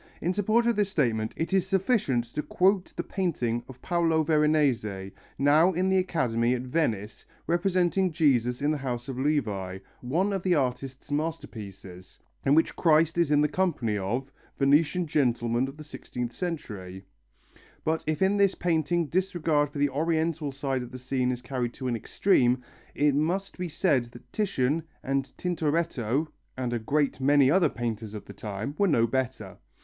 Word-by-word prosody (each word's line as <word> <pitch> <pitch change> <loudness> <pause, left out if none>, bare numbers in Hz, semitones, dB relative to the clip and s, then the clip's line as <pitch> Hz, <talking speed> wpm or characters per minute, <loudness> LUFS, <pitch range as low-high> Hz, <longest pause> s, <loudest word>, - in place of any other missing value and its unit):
In 175 +3 0
support 215 +4 +2
of 235 -1 +2
this 205 -1 +1
statement 115 - 0
it 165 +4 -2
is 190 -1 +2
sufficient 190 - +1
to 150 - -1
quote 185 +3 +1
the - - -2
painting 125 - -1
of 130 -1 -12
Paolo 165 -3 +2
Veronese, 140 -11 +1 0.3
now 155 +6 +4
in 185 +2 +1
the 190 0 +4
Academy 125 -9 +1
at 125 - -4
Venice, 115 -7 -2 0.2
representing 180 +1 +1
Jesus 130 -6 +2
in 150 - +3
the 155 - -1
house 125 -2 -4
of 130 -2 -5
Levi, 105 -11 -1 0.2
one 175 +11 0
of 195 - -1
the 180 -1 +2
artist's 135 0 -2
masterpieces, 100 - -5 0.3
in 140 - +4
which 160 - +2
Christ 165 -1 +3
is 170 -4 +3
in 145 -1 +4
the 150 - +4
company 150 - 0
of 120 +8 -2 0.3
Venetian 150 +6 +3
gentlemen 120 -4 +1
of 135 +2 -9
the 155 - -9
sixteenth 125 -5 -6
century; 100 - -5 0.8
but 160 +1 0
if 155 +4 +1
in 195 +2 +3
this 200 -1 +3
painting 170 0 +1
disregard 160 -3 +1
for 145 - -9
the 145 0 +2
Oriental 160 +1 0
side 135 -1 -2
of 125 - -7
the 130 - -8
scene 130 0 -1
is 125 -1 -5
carried 125 -2 -3
to 130 - -5
an 120 - 0
extreme, 125 - +2 0.3
it 145 0 +3
must 175 +7 -1
be 180 -1 -3
said 150 -6 +1
that 120 0 -16
Titian 165 - 0 0.2
and 135 0 -1
Tintoretto, 160 -5 0 0.3
and 125 -2 -2
a 120 - 0
great 140 +5 0
many 140 0 +5
other 180 +1 +4
painters 110 -2 -4
of 105 - -7
the 100 - -10
time, 105 +6 -5
were 200 - +4
no 115 -9 +3
better. 130 +2 -3
145 Hz, 170 wpm, -27 LUFS, 125-170 Hz, 0.8 s, many